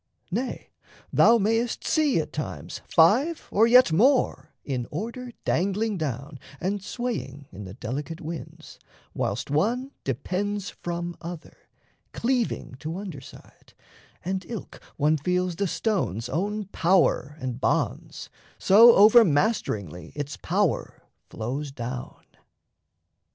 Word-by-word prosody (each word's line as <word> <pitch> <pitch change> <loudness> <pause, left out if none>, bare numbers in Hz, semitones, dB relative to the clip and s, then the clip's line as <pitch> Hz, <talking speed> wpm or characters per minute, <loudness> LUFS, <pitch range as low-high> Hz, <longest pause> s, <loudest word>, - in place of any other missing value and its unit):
Nay, 245 +7 -3 0.4
thou 235 - +6
mayest 225 +3 0
see 300 - +2
at 155 - -4
times 90 - -5
Five 250 - +3
or 220 +3 +4
yet 250 -5 +6
more 250 - +2
in 125 -4 -3
order 235 - -5
dangling 200 +3 0
down 140 -1 -4 0.2
And 195 +2 -2
swaying 195 - -4
in 100 +2 -9
the 95 +1 -9
delicate 145 +7 -5
winds, 165 +1 -8 0.3
whilst - - -2
one 240 - 0
Depends 195 - -2
from 175 0 -5
other, 170 -1 -8 0.6
cleaving 240 - -1
to 160 +4 -5
under 185 -9 -7
side, - - -16 0.5
And 190 +1 -2
ilk 230 -5 -8 0.2
one 150 +2 +3
feels 180 +3 -1
the 200 - 0
stone's 130 - -1
own 205 +6 -2
power 170 -4 +2
and 130 -1 -5
bonds - - -1 0.3
So 230 +5 +7
over 220 +4 +8
masteringly 110 - -1
its 145 0 -4
power 190 -1 -1 0.3
flows 135 +6 -4
down. 125 -1 -6
175 Hz, 120 wpm, -26 LUFS, 145-220 Hz, 0.6 s, over